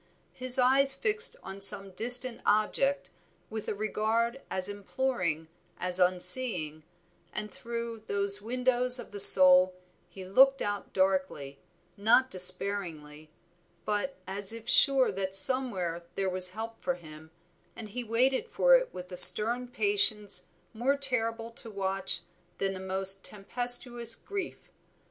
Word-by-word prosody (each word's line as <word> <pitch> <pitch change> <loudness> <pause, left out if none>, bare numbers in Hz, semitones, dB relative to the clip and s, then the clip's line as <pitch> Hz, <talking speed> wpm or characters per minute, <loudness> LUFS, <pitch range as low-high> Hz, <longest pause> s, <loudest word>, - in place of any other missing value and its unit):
His 255 0 +1
eyes 270 +2 +3
fixed 440 +3 -3
on 195 +1 -11
some 195 0 +2
distant 245 +4 +1
object 245 +7 -1 0.4
with 220 -1 -8
a - - -4
regard 225 +4 -3
as 185 0 -1
imploring 200 -6 -4 0.3
as 180 0 +2
unseeing, 180 -3 +1 0.5
and 210 -1 -7
through 235 +1 -8
those 200 0 -1
windows 250 +2 0
of 245 - -10
the 205 - -8
soul 185 -1 +7 0.3
he 190 -1 -12
looked 270 +8 +3
out 205 -1 -6
darkly, 185 -8 -3 0.4
not 235 +6 +1
despairingly; 180 -5 -1 0.6
but 210 +6 -4
as 195 +1 -2
if 230 0 -10
sure 270 0 +3
that 190 0 -3
somewhere 190 -7 +1
there 195 -1 -3
was 185 0 -1
help 225 +1 -8
for 270 - -3
him, 155 -2 -15 0.5
and 215 - -11
he 245 +4 -7
waited 255 - -1
for - - +2
it - - -1
with 180 0 -11
a 180 - -9
stern 240 +6 +6
patience 240 - -1 0.3
more 255 +5 -2
terrible 230 -4 0
to 230 0 -11
watch 195 -3 -3 0.4
than 195 0 -3
the 190 - -9
most 190 +1 +2
tempestuous 240 +2 +2
grief. 405 -1 -9
210 Hz, 135 wpm, -27 LUFS, 190-250 Hz, 0.6 s, soul